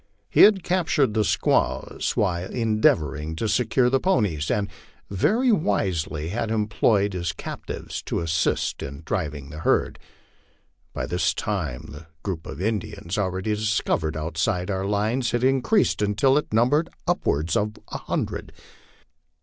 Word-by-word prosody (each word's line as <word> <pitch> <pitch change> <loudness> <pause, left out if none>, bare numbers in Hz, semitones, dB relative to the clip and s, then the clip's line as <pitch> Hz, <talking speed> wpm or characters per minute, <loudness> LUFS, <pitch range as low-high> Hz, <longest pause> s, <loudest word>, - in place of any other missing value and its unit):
He - - +5
had 200 -4 +7
captured 160 - +1
the 110 -1 +2
squaws 65 -9 0
while 90 -2 0
endeavoring 80 - +1
to 110 - -2
secure 125 +3 +2
the 135 +2 +3
ponies, 105 - +1
and 100 -1 +1 0.4
very 225 - +2
wisely 90 - 0
had 110 +3 -2
employed 105 -2 +2
his 85 -3 -2
captives - - -6
to - - -1
assist 85 -1 0
in 70 +3 -7
driving 75 -6 -3
the 75 - -8
herd. - - +1 0.9
By - - -3
this 90 +1 0
time 85 -12 -3
the 75 +3 -11 0.2
group 90 -6 -4
of 70 - -7
Indians 100 -2 -2
already 95 +2 -1
discovered 105 -7 0
outside 90 +5 -1
our 95 0 -2
lines 110 +5 0
had 120 +1 -1
increased 135 - +2
until 105 +6 +3
it 150 - 0
numbered 130 +9 +3 0.2
upwards 80 +3 0
of 105 +1 0 0.2
a - - -5
hundred. - - -3
100 Hz, 140 wpm, -24 LUFS, 80-115 Hz, 0.9 s, had